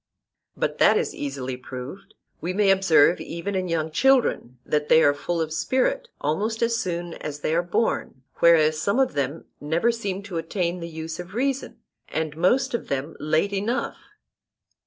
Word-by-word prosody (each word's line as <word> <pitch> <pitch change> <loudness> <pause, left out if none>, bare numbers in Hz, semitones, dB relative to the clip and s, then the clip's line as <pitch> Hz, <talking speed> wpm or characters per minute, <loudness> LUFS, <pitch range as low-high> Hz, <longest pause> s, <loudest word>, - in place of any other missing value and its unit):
But - - -2
that - - +6
is - - -1
easily 135 -2 -4
proved:—We 135 +6 -8
may 200 0 +4
observe 180 -4 +4
even 170 +4 -5
in 185 -1 -1
young 160 -2 -1
children 240 - +2
that 150 -1 -1
they 160 - +6
are 145 - +5
full 170 +4 -3
of 160 -1 -2
spirit - - 0
almost 210 +10 -1
as 230 0 +2
soon 175 -5 -3
as 145 -1 -7
they 155 - 0
are 170 - +3
born, 175 - -1
whereas 155 -2 +4
some 200 +7 +1
of 265 - +2
them 140 +2 -2
never 165 +10 +1
seem 200 -4 -4
to 195 -4 -5
attain 170 +1 -2
to - - -9
the 170 - -5
use 160 0 -6
of 180 +3 -8
reason, 270 +2 -2 0.3
and 155 -1 -2
most 250 - +2
of 235 - -3
them 140 +3 -3
late 155 +7 +1
enough. 220 +7 -1
170 Hz, 175 wpm, -24 LUFS, 155-205 Hz, 0.3 s, that